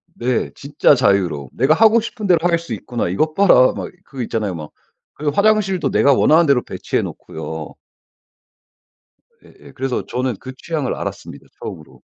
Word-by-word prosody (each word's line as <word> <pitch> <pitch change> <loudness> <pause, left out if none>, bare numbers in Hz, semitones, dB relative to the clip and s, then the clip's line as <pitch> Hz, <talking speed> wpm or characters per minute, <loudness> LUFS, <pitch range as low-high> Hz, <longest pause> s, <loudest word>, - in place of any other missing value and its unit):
네. 125 0 -1
진짜 145 0 +2
자유로움. 95 - +1
'내가 135 +5 +3
하고 225 +5 +5
싶은 225 -2 -5
대로 175 -3 +4
할 170 -1 +2
수 170 - -7
있구나. 120 -7 -3
이것 155 - 0
봐라.' 185 -10 +5
막 - - -5
이 - - -18
그 130 -3 -6
있잖아요. 105 -5 -2
막 75 -2 -8 0.4
그리고 150 -1 -2
화장실도 200 -2 +2
내가 140 - +4
원하는 160 +5 +4
대로 140 -4 +3
배치해 - - -3
놓고요. - - -7 1.7
예예. - - -17
그래서 135 -1 -3
저는 125 -2 -2
그 130 - -9
취향을 150 -3 -3
알았습니다. - - -7
처음으로. 75 - -9
140 Hz, 355 characters per minute, -19 LUFS, 120-170 Hz, 1.7 s, 하고